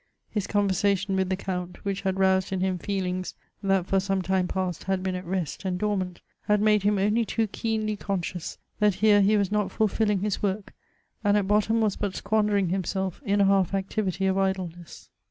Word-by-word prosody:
His 210 -4 -2
conversation 200 -1 +1
with 190 -1 0
the 190 - +1
Count, 180 -1 -5
which 200 0 -2
had 190 -1 -1
roused 190 0 +2
in 190 - -1
him 185 -1 0
feelings 185 -1 -3 0.3
that 195 -3 +2
for 195 +1 +2
some 195 0 -1
time 185 0 +1
past 185 -3 -3
had 190 -1 -1
been 190 -1 -1
at 180 -1 -5
rest 180 -3 -3
and 185 -2 -1
dormant, 185 -3 -2 0.3
had 210 0 +4
made 210 0 +4
him 205 +1 +2
only 210 +4 +2
too 225 0 0
keenly 215 0 -2
conscious 185 -4 -4 0.2
that 210 -3 +3
here 205 0 +5
he 210 +2 +4
was 200 -2 0
not 210 -2 +1
fulfilling 210 -2 +1
his 210 -1 -1
work, 200 0 -2 0.5
and 205 0 +4
at 200 -2 0
bottom 215 +2 +2
was 210 -3 +1
but 200 -2 -2
squandering 210 -3 +1
himself 190 - -2
in 200 +1 +3
a - - +5
half 195 -1 +3
activity 195 -1 -1
of 190 0 +2
idleness. 180 -3 -3
195 Hz, 195 wpm, -26 LUFS, 185-205 Hz, 0.5 s, here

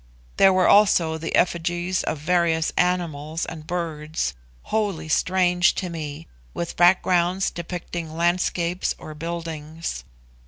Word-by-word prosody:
There 195 - +7
were 185 -1 +3
also 170 -6 +4
the 165 - -2
effigies 175 +1 +1
of 155 - -2
various 165 0 +1
animals 165 -3 -1
and 155 -1 -8
birds, 160 - -3 0.3
wholly 200 -8 -2
strange 180 +2 +2
to 180 -2 -3
me, 155 -1 -6 0.3
with 170 - -4
backgrounds 180 +1 +3
depicting 170 -1 -6
landscapes 175 +1 0
or 155 - -9
buildings. 165 0 -5
170 Hz, 115 wpm, -23 LUFS, 160-180 Hz, 0.3 s, There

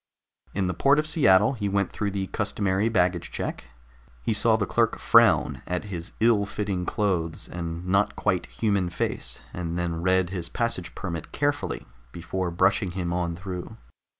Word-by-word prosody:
In 100 -1 +1
the 90 - 0
port 140 - +4
of 150 - +2
Seattle 115 - +4
he 105 -5 -2
went 100 -1 0
through 105 - -2
the 95 -1 -2
customary 100 +1 0
baggage 90 -5 +1
check. - - -4 0.6
He - - +1
saw 110 +1 +3
the 105 -2 0
clerk - - +1
frown - - +4
at 90 0 -2
his 85 -1 -5
ill 110 -3 +3
fitting 100 -3 -3
clothes 90 -7 -1
and 85 0 -5
not 100 +2 +2
quite - - 0
human 95 - 0
face, 85 - -3
and 85 -1 -3
then 85 -1 -2
read 95 0 +2
his 90 -3 -4
passage 115 -7 -2
permit 85 -4 -5
carefully 145 0 -1 0.3
before 90 +3 -3
brushing 95 +2 +2
him 85 -2 -1
on 85 -1 -1
through. 90 0 -7
95 Hz, 165 wpm, -26 LUFS, 85-105 Hz, 0.6 s, port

